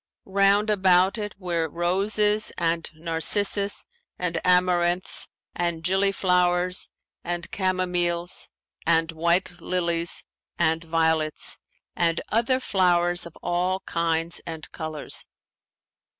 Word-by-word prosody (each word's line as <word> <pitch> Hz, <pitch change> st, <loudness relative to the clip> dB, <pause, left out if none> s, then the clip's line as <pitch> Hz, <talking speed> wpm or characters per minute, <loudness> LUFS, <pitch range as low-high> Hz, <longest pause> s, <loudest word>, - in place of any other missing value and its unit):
Round 200 Hz, +2 st, +3 dB
about 190 Hz, +1 st, +4 dB
it 210 Hz, -1 st, -4 dB
were 170 Hz, -4 st, -1 dB
roses 205 Hz, +5 st, +1 dB
and 165 Hz, -1 st, 0 dB
narcissus 195 Hz, +5 st, +1 dB, 0.3 s
and 170 Hz, -2 st, -1 dB
amaranths 180 Hz, 0 st, +2 dB, 0.3 s
and 170 Hz, -2 st, -2 dB
gilly 195 Hz, +3 st, +3 dB
flowers 180 Hz, -1 st, +1 dB, 0.3 s
and 175 Hz, 0 st, -3 dB
chamomiles 180 Hz, -2 st, -1 dB, 0.4 s
and 165 Hz, 0 st, +3 dB
white 175 Hz, +2 st, 0 dB
lilies 170 Hz, -1 st, -1 dB, 0.3 s
and 160 Hz, -1 st, +1 dB
violets, 160 Hz, -1 st, +1 dB, 0.4 s
and 170 Hz, -1 st, +1 dB
other 235 Hz, +4 st, +2 dB
flowers 175 Hz, -5 st, +2 dB
of 170 Hz, -, -15 dB
all 180 Hz, +2 st, 0 dB
kinds 165 Hz, 0 st, -1 dB
and 160 Hz, -2 st, -6 dB
colours. 155 Hz, -2 st, -6 dB
175 Hz, 100 wpm, -25 LUFS, 170-190 Hz, 0.4 s, about